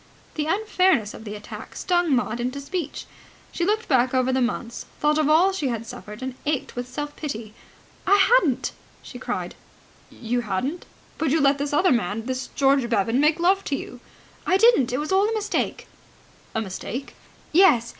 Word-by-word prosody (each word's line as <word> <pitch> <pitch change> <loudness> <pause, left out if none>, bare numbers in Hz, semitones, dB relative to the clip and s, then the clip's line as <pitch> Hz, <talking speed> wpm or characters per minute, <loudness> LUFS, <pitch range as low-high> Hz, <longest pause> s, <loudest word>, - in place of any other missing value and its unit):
The 300 -1 -2
unfairness 370 - +2
of 220 - -11
the 210 0 -5
attack 210 - -9
stung 350 -5 +1
Maud 240 -1 -1
to 280 - -5
speech. 305 +1 -4 0.5
She 345 - -2
looked 435 +3 0
back 260 -2 +2
over 255 0 +2
the 260 - +1
months, 240 -1 -3
thought 300 +1 +2
of 305 -1 +2
all 350 +5 +5
she 310 -7 -1
had 230 -2 -3
suffered, 210 +1 -9
and 260 0 -3
ached 295 -3 -2
with 245 0 -4
self 290 +3 -5
pity. 225 -8 -6 0.5
"I 400 - +6
hadn't," 385 - +3 0.3
she - - -10
cried. - - -4 0.6
"You 245 +1 -2
hadn't? 240 - -3 0.3
But 320 -2 +1
you 320 +4 +2
let 280 -1 +3
this 285 0 -2
other 355 +5 +3
man, 220 -1 0
this 260 0 -3
George 270 -3 +3
Bevan, 230 +2 +1
make 305 +3 +3
love 380 +3 +3
to 285 - -1
you." 250 - -7 0.4
"I 375 - +3
didn't! 435 - +5
That 250 +2 -1
was 300 +3 -3
all 390 +3 +3
a - - -1
mistake." 420 -1 -2 0.7
"A 225 - +1
mistake?" 220 +6 -6 0.4
"Yes. 305 -10 +5
280 Hz, 185 wpm, -24 LUFS, 240-345 Hz, 0.7 s, I